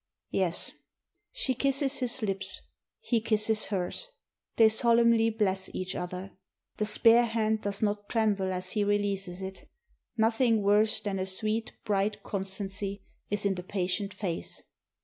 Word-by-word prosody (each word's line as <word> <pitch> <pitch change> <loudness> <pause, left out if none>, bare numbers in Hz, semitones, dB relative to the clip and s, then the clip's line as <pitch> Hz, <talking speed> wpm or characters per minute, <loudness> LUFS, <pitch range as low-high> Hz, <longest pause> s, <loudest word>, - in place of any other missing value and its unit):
"Yes." 180 -3 0 0.6
She - - 0
kisses 275 +2 0
his 250 -1 -2
lips; 195 -2 -1 0.4
he 235 -2 +1
kisses 215 0 +2
hers; 195 - -2 0.5
they 225 - +7
solemnly 230 0 +4
bless 195 -4 0
each 185 0 -3
other. 180 +2 -5 0.5
The 210 - 0
spare 230 +3 +5
hand 220 -1 0
does 205 +1 -2
not 205 -1 -1
tremble 205 -4 +1
as 185 0 -2
he 210 - +1
re 205 0 +3
leases 195 -2 -3
it; 190 0 -8 0.5
nothing 225 0 +3
worse 210 +2 +3
than 200 -2 -2
a 185 - -2
sweet, 215 +4 -1
bright 205 0 0
constancy 195 0 -4 0.3
is 205 0 -1
in 200 - +3
the 180 - -5
patient 190 +2 -2
face. 185 -4 -5
205 Hz, 145 wpm, -29 LUFS, 190-225 Hz, 0.6 s, they